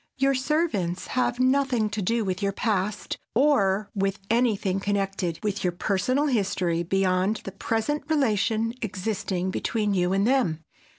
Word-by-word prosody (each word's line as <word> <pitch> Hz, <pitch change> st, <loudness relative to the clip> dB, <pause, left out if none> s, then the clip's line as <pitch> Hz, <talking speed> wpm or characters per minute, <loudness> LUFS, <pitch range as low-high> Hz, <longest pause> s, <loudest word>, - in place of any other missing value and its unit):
Your 270 Hz, +1 st, +3 dB
servants 260 Hz, -, 0 dB
have 250 Hz, -1 st, 0 dB
nothing 255 Hz, -3 st, +2 dB
to 205 Hz, 0 st, -2 dB
do 225 Hz, +3 st, 0 dB
with 185 Hz, 0 st, -2 dB
your 200 Hz, 0 st, +1 dB
past, 205 Hz, -1 st, -1 dB, 0.2 s
or 215 Hz, -7 st, +3 dB
with 195 Hz, 0 st, 0 dB
anything 215 Hz, -5 st, +1 dB
connected 195 Hz, -4 st, -1 dB
with 205 Hz, -2 st, -2 dB
your 180 Hz, -1 st, +1 dB
personal 205 Hz, +10 st, 0 dB
history 190 Hz, -, 0 dB
beyond 190 Hz, +3 st, +1 dB
the 195 Hz, -, -6 dB
present 230 Hz, +9 st, -2 dB
relation 230 Hz, -5 st, +1 dB
existing 190 Hz, -3 st, -2 dB
between 210 Hz, +1 st, -1 dB
you 180 Hz, -1 st, +1 dB
and 195 Hz, +1 st, +2 dB
them. 225 Hz, -12 st, +1 dB
205 Hz, 140 wpm, -26 LUFS, 190-245 Hz, 0.2 s, Your